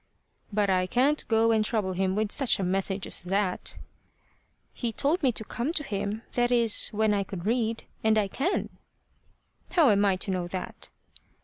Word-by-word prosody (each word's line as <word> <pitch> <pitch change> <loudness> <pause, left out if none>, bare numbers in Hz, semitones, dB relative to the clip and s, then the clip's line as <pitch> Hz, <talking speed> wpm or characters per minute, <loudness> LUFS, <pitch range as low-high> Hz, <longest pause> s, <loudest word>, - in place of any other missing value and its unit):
"But 205 0 +1
I 185 -1 +2
can't 270 +9 +1
go 225 0 +3
and 220 -1 +3
trouble 210 -4 -1
him 190 +1 0
with 215 0 0
such 270 -4 +2
a 195 - -2
message 190 +1 -1
as - - -1
that." 190 +1 -1 1.0
"He 235 -2 -3
told 290 - +1
me 265 -4 +3
to 220 - -3
come 245 +8 -2
to 300 - -1
him 210 -1 -3
that 240 0 +1
is, 235 -3 +3
when 215 0 +1
I 200 -1 +1
could 190 -2 -7
read 230 0 0 0.2
and 220 0 +3
I 210 -2 +2
can." 280 - -1 1.0
"How 315 - +5
am 200 0 +3
I 195 -2 +3
to 190 +2 -4
know 180 -2 -2
that?" 185 +1 -7
215 Hz, 185 wpm, -27 LUFS, 195-235 Hz, 1.0 s, How